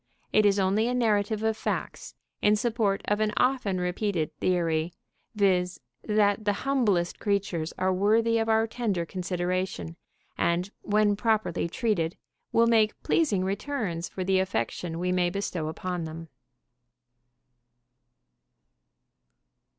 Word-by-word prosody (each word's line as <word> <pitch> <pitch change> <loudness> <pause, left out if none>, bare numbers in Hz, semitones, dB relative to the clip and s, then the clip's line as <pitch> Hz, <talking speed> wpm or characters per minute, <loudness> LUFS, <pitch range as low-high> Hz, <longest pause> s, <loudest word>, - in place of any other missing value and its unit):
It 215 -1 +5
is 200 0 +3
only 200 +4 +2
a 250 - 0
narrative 215 -2 +1
of 220 0 +1
facts - - -4 0.3
in 210 0 +4
support 215 -3 0
of 210 0 +1
an 215 -1 +1
often 250 -8 +1
repeated 180 -3 -1
theory, 165 -2 0 0.4
viz.: 180 -3 +2 0.2
that 210 0 +2
the 205 -1 +2
humblest 210 -11 +1
creatures 195 -6 -1
are 185 0 +1
worthy 225 +4 +3
of 225 0 -1
our 220 0 +4
tender 220 -7 -2
consideration, 180 -1 -3 0.4
and, 175 +3 +1
when 210 0 +2
properly 210 -6 0
treated, 175 -6 -1 0.3
will 230 - +4
make 220 -2 +3
pleasing 210 - +2
returns 195 -4 -3
for 185 - -4
the 190 0 +2
affection 165 0 -2
we 180 +1 -1
may 180 -1 +2
bestow 180 -4 -3
upon 175 +1 -4
them. 160 +1 -8
200 Hz, 125 wpm, -27 LUFS, 180-215 Hz, 0.4 s, It